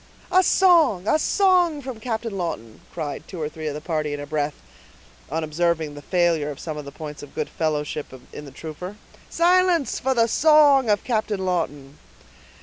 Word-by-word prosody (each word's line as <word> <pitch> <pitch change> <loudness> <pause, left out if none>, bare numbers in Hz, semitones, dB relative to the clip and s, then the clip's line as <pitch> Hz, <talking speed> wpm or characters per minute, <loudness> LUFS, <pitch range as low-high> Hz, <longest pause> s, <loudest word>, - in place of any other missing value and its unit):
"A 370 - +6
song, 330 - +4
a 310 - +3
song 355 -5 +2
from 255 -4 -6
Captain 225 -2 -3
Lawton!" 165 - -5
cried 155 -4 -5
two 180 - -8
or 155 - -2
three 155 0 -7
of 145 - -3
the 150 - -6
party 155 -3 -2
in - - -7
a 145 - -5
breath, 150 0 -2 0.7
on 160 +1 -2
observing 160 -1 -1
the 145 - -9
failure 170 -3 +1
of 145 -1 -7
some 155 -2 -5
of 150 -1 -7
the 140 - -8
points 150 -2 -8
of 145 - -12
good 155 - -2
fellowship 150 -1 -2 0.3
in 150 - -8
the 140 - -11
trooper. 160 +7 -8 0.3
"Silence, 350 -3 +2
for 265 0 0
the 230 -1 +4
song 285 -1 +5
of 205 -1 +2
Captain 215 -5 -1
Lawton." 145 -6 -3
175 Hz, 185 wpm, -23 LUFS, -, 0.7 s, A